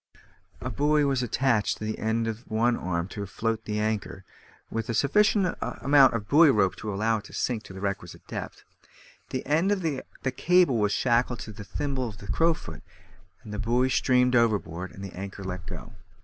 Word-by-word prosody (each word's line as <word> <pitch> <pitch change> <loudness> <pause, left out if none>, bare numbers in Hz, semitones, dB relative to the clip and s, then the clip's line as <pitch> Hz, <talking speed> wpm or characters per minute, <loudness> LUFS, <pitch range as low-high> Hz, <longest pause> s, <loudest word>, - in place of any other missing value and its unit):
A - - -3
buoy 150 +1 +2
was 135 -2 +1
then 125 - -1
attached 115 -3 +1
to - - -8
the 110 - -3
end 110 +1 0
of 115 +2 -6
one 115 +2 +2
arm 85 -3 -2
to 100 - -5
float 110 +2 -2
the 105 0 -2
anchor, 105 -2 -2 0.5
with 115 0 -3
a 115 - 0
sufficient 200 - +3
amount 140 -2 +4
of 105 -3 -3
buoy 155 +2 +7
rope 95 -7 +3
to 105 - -4
allow 110 +3 +1
it - - -14
to - - -13
sink 120 -4 -1
to - - -10
the 95 - -8
requisite 100 -3 -4
depth; - - -7 0.7
the 130 - -4
end 160 +8 +2
of 195 -3 0
the 145 -5 -1 0.3
cable 175 -8 +4
was 105 -1 +2
shackled 120 +1 +1
into 110 - -7
the 105 0 -9
thimble 130 +4 -3
of 105 - -11
the 100 - -11
crowfoot, 165 +10 0 0.6
the 105 -1 -6
buoy 120 +3 +2
streamed 125 -1 +3
overboard, 100 -7 +1
and 95 - -10
the 95 - -9
anchor 100 +1 -7
let 90 -1 -5
go. - - -8
115 Hz, 195 wpm, -27 LUFS, 105-135 Hz, 0.7 s, buoy